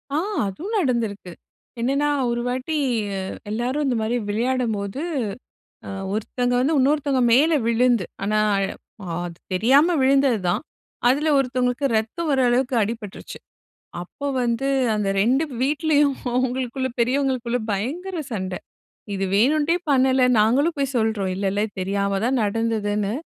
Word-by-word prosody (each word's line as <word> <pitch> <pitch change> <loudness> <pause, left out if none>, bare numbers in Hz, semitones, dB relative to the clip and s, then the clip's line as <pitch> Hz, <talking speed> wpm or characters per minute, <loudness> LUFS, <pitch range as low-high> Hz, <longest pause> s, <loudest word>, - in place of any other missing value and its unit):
ஆ - - +2 0.3
அதுவும் 345 - -5
நடந்திருக்கு. 230 - -1 0.5
என்னான்னா, 275 +5 +1 0.2
ஒரு 235 0 -1
வாட்டி, 260 +5 -2 0.4
அ - - -2 0.3
எல்லாரும் 250 +7 -1
இந்த 260 -3 +1
மாரி 220 +2 -1
விளையாடும்போது, 225 -1 -1 0.9
அ - - -6 0.2
ஒருத்தங்க 245 +3 -1
வந்து 295 +5 +2
உன்னொருத்தங்க 280 0 +2
மேல 295 +7 +5
விழுந்து, 235 -2 +3 0.2
ஆனா 215 +1 +1 0.2
அழ 195 0 +1 0.6
அது 170 -1 -9 0.2
தெரியாம 275 - +4
விழுந்தது 270 -3 +3
தான். 175 - 0 0.5
அதுல 295 +5 +2
ஒருத்தவங்களுக்கு 250 0 0
ரத்தம் 230 +10 -2
வர 270 -2 +2
அளவுக்கு 250 +1 +1
அடிபட்டுருச்சு. 210 -1 -6 0.6
அப்போ 280 +11 -6 0.2
வந்து 235 +3 0 0.3
அந்த 210 -2 0
2 255 +8 +3 0.2
வீட்லயும் 290 0 +2 0.2
அவங்களுக்குள்ள 260 +1 -1
பெரியவங்களுக்குள்ள 250 -1 +1
பயங்கர 320 - -3
சண்டை. 185 -4 -3 0.6
இது 195 0 -1
வேணும்ன்ட்டே 295 - +3
பண்ணல. 260 -1 +3 0.2
நாங்களும் 265 +10 +3
போய் 275 -1 -1
சொல்றோம். 220 -4 0
இல்ல 195 +1 -2
இல்ல 205 +1 0 0.2
தெரியாம 200 +1 0
தான் 255 +2 +1
நடந்ததுன்னு. 210 -1 -1
245 Hz, 125 wpm, -23 LUFS, 215-275 Hz, 0.9 s, மேல